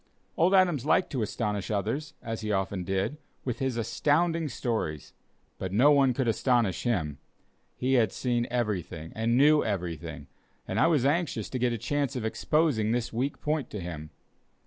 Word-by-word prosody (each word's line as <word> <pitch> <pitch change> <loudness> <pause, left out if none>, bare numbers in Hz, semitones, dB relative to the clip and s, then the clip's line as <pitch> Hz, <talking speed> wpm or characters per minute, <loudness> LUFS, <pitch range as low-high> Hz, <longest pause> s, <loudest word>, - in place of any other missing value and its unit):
Old 180 +4 +4
Adams 175 -9 +3
liked 155 +5 +2
to 130 - -1
astonish 105 -2 -2
others, 115 +10 -2
as 115 -1 -4
he 105 -1 -2
often 95 -1 -1
did, 95 +9 -1 0.3
with 125 -3 -2
his 130 -3 -1
astounding 160 +7 +1
stories, 110 - -3 0.5
but 95 - -3
no 125 +9 +5
one 140 -3 +5
could 125 0 -1
astonish 115 -4 +1
him; 80 - -1 0.6
he 130 +1 0
had 115 -6 +3
seen 120 -2 -1
everything 95 -9 -2
and 115 +2 +1
knew 150 +2 +5
everything, 85 -6 -4 0.4
and - - -1
I - - +5
was 150 -6 +2
anxious 145 - 0
to 130 - -2
get 125 0 +2
a 115 - -1
chance 140 +4 -1
of 120 -3 -3
exposing 115 0 +1
this 120 -1 -2
weak 130 +5 -2
point 150 -3 -1
to 105 - -5
him. 80 -4 -6
120 Hz, 170 wpm, -28 LUFS, 100-140 Hz, 0.6 s, no